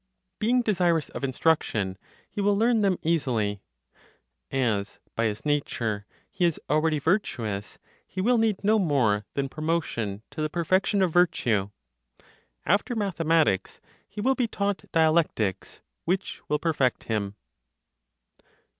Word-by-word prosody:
Being 245 +3 +2
desirous 175 -7 +1
of - - -7
instruction, 130 -8 +1 0.3
he 205 - -4
will 200 0 +3
learn 230 +1 +3
them 195 -3 +2
easily; 120 -11 0 0.9
as, 110 -7 -1 0.2
by 115 - +1
his 105 +2 -2
nature, 115 -8 -1 0.2
he 185 - -2
is 170 -3 +2
already 155 +1 +2
virtuous, 130 - -1 0.3
he - - -7
will 235 +5 +3
need 215 -3 +1
no 215 +2 +4
more 120 - +2
than 140 -1 0
promotion 135 -10 -2
to - - -5
the 155 - 0
perfection 185 +4 +2
of 175 -4 0
virtue. 120 - +2 1.0
After 200 - +1
mathematics, 165 - +1 0.3
he 205 +1 -6
will 265 +5 +3
be 250 -3 0
taught 200 -2 -3
dialectics, 155 - +1 0.2
which 185 +3 -2
will 150 - +2
perfect 150 -6 0
him. 105 -3 -2
160 Hz, 130 wpm, -26 LUFS, -, 1.0 s, no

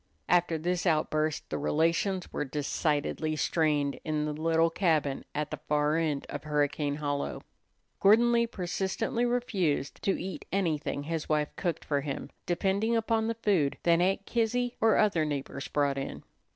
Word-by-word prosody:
After 175 -2 +3
this 180 +3 -1
outburst 155 -1 +1
the - - -1
relations 165 +5 0
were - - -1
decidedly 150 +2 -1
strained 150 -2 +1
in 155 -1 -1
the 150 - -2
little 165 +2 +2
cabin 155 -6 +1
at 150 0 -2
the - - -4
far 150 +1 +2
end 155 -4 0
of 145 - -6
Hurricane 145 -1 0
Hollow. 145 -1 -3 0.6
Gordon 225 +4 +6
Lee 235 0 +3
persistently 195 +4 -1
refused 195 - -1
to 195 - 0
eat 185 -5 -6
anything 160 -6 -1
his 160 +1 -3
wife 150 -1 0
cooked 170 -4 -2
for 145 -2 0
him, 140 -1 -5 0.2
depending 200 +6 +1
upon 225 0 +1
the 230 - -1
food 170 -10 +2
that 170 0 +4
Aunt 195 +2 +1
Kizzy 245 +1 0
or 225 -1 +5
other 200 -7 +3
neighbors 140 -2 -4
brought 140 -2 0
in. 135 - -6
160 Hz, 155 wpm, -29 LUFS, 150-195 Hz, 0.6 s, Gordon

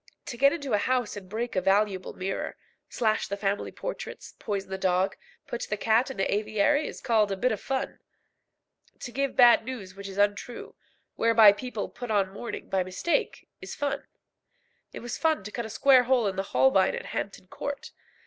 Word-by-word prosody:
To - - -6
get 275 +3 +5
into 285 -6 -3
a 205 - +4
house 250 0 0
and 190 -3 -9
break 230 +3 -3
a 185 - +2
valuable 195 0 +1
mirror, 190 +1 -4 0.3
slash 220 -2 0
the 200 - -4
family 200 0 -1
portraits, - - -7
poison 200 -3 -4
the 190 - -2
dog, 185 0 +1 0.3
put 240 - -5
the 210 - -1
cat 225 +5 +2
in 265 - -7
the 195 - 0
aviary, 215 +8 +1
is - - -8
called 220 -4 +2
"cutting 195 - -2
a - - -16
bit 255 - +4
of 215 - -3
fun." 270 -1 -3 1.0
To 240 - -6
give 275 +2 -1
bad 240 -2 +7
news 220 -7 -7
which 200 +1 -8
is 195 - -9
untrue, 205 +4 -1 0.4
whereby 225 -2 +7
people 220 0 -4
put 245 -1 -8
on 200 -3 +1
mourning 235 +4 -6
by 190 - +1
mistake, 185 - -2
is - - -7
fun. 285 -1 -3 0.8
It - - -8
was 240 - -5
fun 320 -9 +1
to 210 - -7
cut 235 0 -4
a - - -11
square 255 +2 +5
hole 250 -2 +3
in 195 -2 -1
the 195 +1 -3
Holbein 230 -8 +4
at - - -6
Hampton 195 -2 -5
Court. 285 +9 -6
215 Hz, 195 wpm, -27 LUFS, 195-250 Hz, 1.0 s, bad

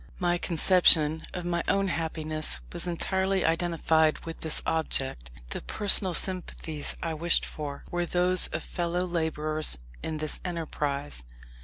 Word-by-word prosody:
My 175 -1 0
conception 160 -3 +4
of 180 -1 -6
my 170 -1 0
own 195 -1 +1
happiness 155 - -3
was - - 0
entirely 190 +2 0
identified 165 -1 +2
with 165 0 -7
this 160 -1 0
object. 135 - -2 0.2
The - - -3
personal 190 - +4
sympathies 165 -4 0
I 165 -1 -2
wished 170 +2 +2
for 145 -2 -7
were 175 0 -1
those 180 +1 +4
of - - -5
fellow 175 +1 -2
labourers 155 - 0 0.2
in 155 - -4
this 155 0 -2
enterprise. 145 - -4
165 Hz, 135 wpm, -27 LUFS, 155-175 Hz, 0.2 s, conception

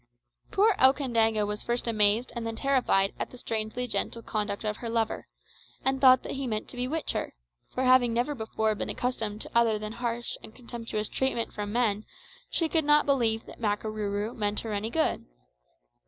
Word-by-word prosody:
Poor 420 +2 +4
Okandaga 230 -5 +3
was 210 0 -3
first 240 0 -1
amazed 215 +2 +3
and 235 - -3
then 225 0 -3
terrified 245 -8 +2
at - - -2
the 250 - -12
strangely 225 +1 -2
gentle 230 +1 -2
conduct 210 -1 -2
of 210 0 -2
her 235 - -5
lover, 225 -1 -1 0.6
and 265 0 +1
thought 255 -1 +7
that - - -5
he 275 -1 -3
meant 215 -2 -3
to - - -8
bewitch 255 +6 0
her; - - -3 0.3
for 255 - -2
having 255 -2 +5
never 240 +6 0
before 220 -3 -1
been 210 - -4
accustomed 220 -4 -2
to - - -5
other 230 -2 +4
than 215 0 -5
harsh 235 0 -3
and 220 - -11
contemptuous 230 -3 -4
treatment 265 -3 -1
from 205 0 -4
men, 215 -3 +1 0.5
she 330 - +2
could 320 0 +1
not 295 +1 +4
believe 230 -5 +2
that - - -13
Makarooroo 210 0 -2
meant 210 -1 0
her 225 -2 -4
any 205 +2 -2
good. 315 +6 0
230 Hz, 185 wpm, -28 LUFS, 215-255 Hz, 0.6 s, thought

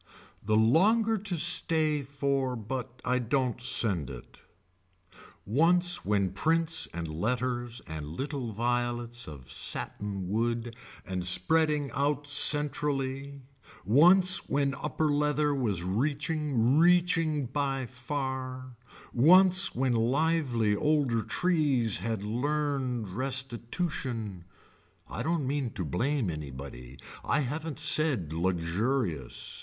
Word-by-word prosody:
The 110 +1 +1
longer 210 - +3
to 190 -3 -2
stay 160 -2 +1
for 140 -2 -1
but 125 +2 -6
I 125 0 +1
don't 125 0 -1
send 95 - +1
it. 65 -3 -11 1.1
Once 175 - +2
when 100 -3 0
prints 160 - +1
and 85 -1 -5
letters 120 +7 -3
and 80 -2 -6
little 130 - -4
violets 120 +1 -2
of 70 -4 -10
satin 100 -3 -3
wood 115 +3 -2 0.3
and 95 -2 -3
spreading 150 - +2
out 145 +2 -1
centrally, 140 -1 +1 0.4
once 175 - +5
when 140 -1 +1
upper 155 +3 -2
leather 150 0 +1
was 105 -10 -1
reaching 140 - 0
reaching 165 -4 +3
by 135 0 -2
far, 130 0 -5 0.4
once 185 +8 +5
when 130 0 +1
lively 125 -2 +1
older 140 -3 +1
trees 140 - +1
had 110 -3 -3
learned 130 0 -2
restitution, 120 - -3 0.6
I 110 - -5
don't 160 +1 -1
mean 135 -2 -1
to 90 - -4
blame 115 - -1
anybody. 70 -4 -8 0.3
I 150 - +1
haven't 150 +3 -4
said 150 - +1
luxurious. 85 - -2
130 Hz, 105 wpm, -29 LUFS, 110-150 Hz, 1.1 s, once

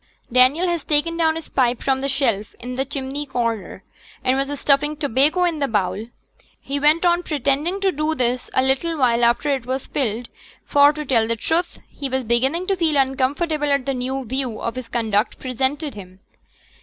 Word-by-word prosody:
Daniel 255 +8 +4
had 345 -2 0
taken 310 +2 +1
down 320 -1 +2
his 325 -1 -6
pipe 245 -2 +1
from 265 -1 +1
the 275 - -1
shelf 230 -7 -1
in 250 +1 -6
the 265 +2 -1
chimney 275 +1 -4
corner, 230 -5 -3 0.4
and 255 - +2
was 275 +1 -2
stuffing 295 +1 +2
tobacco 290 +5 +2
into 340 -3 0
the 280 - +1
bowl. 210 0 -1 0.5
He 280 +1 -3
went 305 +4 +3
on 345 0 +3
pretending 300 +4 -1
to 390 -1 +3
do 305 +1 -1
this 250 -2 -1
a 260 - +4
little 275 +5 0
while 240 -3 +2
after 235 +5 +2
it 255 -3 -4
was 260 +1 -2
filled; 240 -3 -2 0.4
for, 285 0 +5
to 300 0 -6
tell 230 -5 +2
the 230 - 0
truth, 335 +9 -1
he 280 -2 -6
was 260 0 -1
beginning 265 +10 +1
to 390 - +1
feel 320 -4 +1
uncomfortable 285 +3 +1
at 280 -3 +1
the 275 - 0
new 260 +1 -3
view 255 -1 -3
of 235 - -3
his 255 -2 -7
conduct 220 -2 0
presented 270 +4 -2
to 210 - -9
him. 185 -1 -13
270 Hz, 195 wpm, -21 LUFS, 250-300 Hz, 0.5 s, for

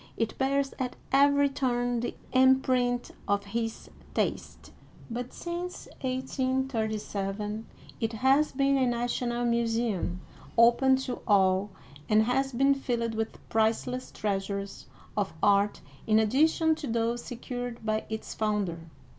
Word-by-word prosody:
it 225 -1 -1
bears 275 +1 +1
at 255 -1 -2 0.2
every 285 +1 +5
turn 245 -3 0
the 240 - -3 0.2
imprint 255 -2 +3 0.2
of 200 0 +1
his 225 +2 -3 0.3
taste; - - -2 0.4
but 245 +2 -4
since 350 +1 -5
1837 225 -6 -2 0.3
it 225 0 -1
has 270 +6 +3
been 275 +1 +2
a 260 -1 +3
national 240 0 -1
museum, 230 -6 0 0.4
open 240 +3 +6
to 260 -1 -3
all, 190 -1 +3 0.4
and 215 0 +5
has 270 +4 +1
been 275 +3 +4
filled 235 -4 -2
with 225 0 -3
priceless 225 +3 0
treasures 200 -1 -3 0.3
of 205 -2 -1
art 200 0 +3 0.3
in 215 -1 +4
addition 310 +9 +3
to 310 -2 -5
those 235 +1 0
secured 245 -1 -6
by 215 0 0
its 220 0 -5
founder. 210 -6 -1
240 Hz, 120 wpm, -28 LUFS, 220-265 Hz, 0.4 s, open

